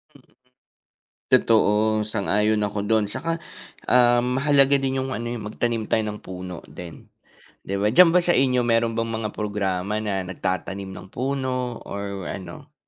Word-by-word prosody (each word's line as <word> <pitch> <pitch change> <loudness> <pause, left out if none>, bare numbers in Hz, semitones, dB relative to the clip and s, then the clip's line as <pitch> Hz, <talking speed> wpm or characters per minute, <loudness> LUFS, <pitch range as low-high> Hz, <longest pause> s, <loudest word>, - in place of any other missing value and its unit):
Mm, - - -18 1.1
totoo 115 -4 +4 0.4
sang-ayon 105 +1 +1
ako 105 0 -2
dun, 110 0 +3
at - - -10
saka, 165 - -2 0.6
um, 125 0 +4
mahalaga 140 -1 +4
din 135 0 -1
'yung 130 0 -3
ano 120 -1 -4
eh 120 - -3
'yung 105 -3 -6
magtanim 115 +1 -1
tayo 110 - +3
ng 105 0 -5
puno 90 -1 -7
din 85 -2 -11 0.6
'di 100 - -5
ba. 100 - +1
Diyan 180 +1 +8
ba - - +7
sa 175 0 +2
inyo 125 -1 +3
meron 115 -1 +2
bang 115 - 0
mga 110 -1 -3
programa 100 -1 -2
na 100 -3 -1
nagtatanim 95 +1 -4
ng 95 0 -9
puno 130 -2 -2
or 100 -2 -5
ano? - - -8
110 Hz, 165 wpm, -23 LUFS, 100-125 Hz, 1.1 s, Diyan